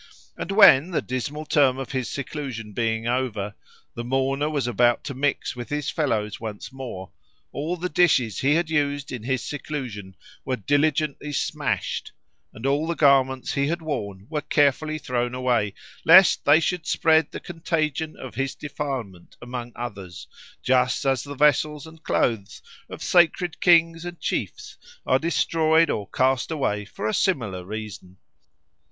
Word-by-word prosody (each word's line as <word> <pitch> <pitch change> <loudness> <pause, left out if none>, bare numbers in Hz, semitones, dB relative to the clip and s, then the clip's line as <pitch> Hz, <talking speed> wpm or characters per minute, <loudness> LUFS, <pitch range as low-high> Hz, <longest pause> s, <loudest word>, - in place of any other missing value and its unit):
And - - -5
when, 185 -7 +7
the 175 - -1
dismal 140 +5 -4
term 140 -4 +3
of 135 -2 -6
his 130 -3 -2
seclusion 130 -6 -5
being 115 0 -1
over, 115 -5 -1 0.4
the 120 - -5
mourner 135 +4 0
was 145 -4 -1
about 120 0 +2
to 140 - -5
mix 140 +1 -1
with 120 -1 -7
his 150 0 -2
fellows 110 -9 -1
once 110 +2 -7
more, 120 -9 -7 0.4
all 160 +5 -3
the 180 +2 -2
dishes 150 - +2
he 140 +3 +3
had 165 -1 0
used 145 -2 0
in 125 - -5
his 130 +1 -2
seclusion 125 -10 -6 0.3
were 130 - -1
diligently 145 - 0
smashed, 140 - -2 0.4
and 110 - -9
all 145 +4 +1
the 170 - -1
garments 130 -3 +3
he 140 0 +1
had 170 +2 -2
worn 100 -11 -4
were 150 0 -3
carefully 150 +2 +1
thrown 125 -3 -2
away, 120 -5 0 0.3
lest 185 +2 +7
they 145 +2 +6
should 170 -1 -2
spread 160 -1 +3
the - - -7
contagion 160 -2 -2
of 130 - -9
his 135 0 -2
defilement 130 - -6
among 120 -1 -6
others, 100 -7 -7 0.4
just 125 0 +2
as 135 -2 +1
the 145 0 -8
vessels 150 +1 +2
and 160 0 -14
clothes 110 -9 -1 0.3
of - - -8
sacred 175 -1 +2
kings 165 -1 +4
and 175 -1 -7
chiefs - - -4 0.3
are 130 - +3
destroyed 160 +1 +2
or 100 -2 -3
cast 130 0 +1
away 105 -10 -1
for 100 +1 -5
a 110 - -1
similar 110 - 0
reason. 100 -2 -8
135 Hz, 155 wpm, -24 LUFS, 120-155 Hz, 0.4 s, when